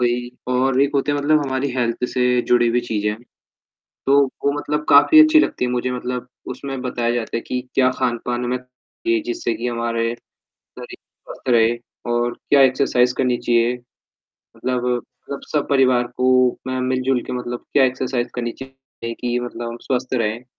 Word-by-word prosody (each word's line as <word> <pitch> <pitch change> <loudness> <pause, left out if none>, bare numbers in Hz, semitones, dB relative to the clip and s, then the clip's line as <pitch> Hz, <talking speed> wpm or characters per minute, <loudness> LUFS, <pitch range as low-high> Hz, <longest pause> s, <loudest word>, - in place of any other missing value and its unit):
वही 120 0 0 0.2
और 130 +1 +2
एक 140 - +2
होते 140 +1 +1
हैं 145 - 0
मतलब 150 +2 +3
हमारी 130 +1 -1
हेल्थ 120 -1 -1
से 125 - 0 0.3
जुड़े 120 -1 +4
हुई 120 +1 +2
चीज़ 110 -3 -3
हैं, 105 0 0 0.9
तो 140 +1 +5 0.2
वो 140 - +3
मतलब 150 +1 -2
काफ़ी 310 - +7
अच्छी 310 0 +6
लगती 125 - 0
है 125 - -1
मुझे 125 0 -1
मतलब 125 0 -4 0.3
उसमें 135 -2 -6
बताया 120 -2 -1
जाता 115 -1 -2
है - - -1
कि 125 - -2
क्या 130 -1 +4
खान-पान 120 0 -1
हमें 125 +1 -1
जी, 125 - -4
जिससे 350 -1 -2
कि 120 - -4
हमारे, 115 -1 -1 0.4
शरीर - - -12
स्वस्थ - - -11
रहे 115 -2 +4 0.4
और 120 0 0 0.2
क्या 140 -1 +6
एक्सरसाइज़ 130 -2 +3
करनी 125 -2 +1
चाहिए। 120 0 +2 0.8
मतलब 125 -1 -2
मतलब 125 +3 -5
सब 150 -2 0
परिवार 130 -3 +3
को 130 0 +3 0.4
मैं 130 0 -2
मिल-जुल 130 0 +1
के 125 - -5
मतलब 120 -1 -5
क्या 140 - +5
एक्सरसाइज़ 130 -1 -1
करनी 120 -1 -2
चाहिए 135 -3 -9
कि 125 0 0
मतलब 120 -1 -5
हम 120 - -7
स्वस्थ 130 0 -2
रहें? 115 -1 -1
125 Hz, 175 wpm, -20 LUFS, 120-135 Hz, 0.9 s, काफ़ी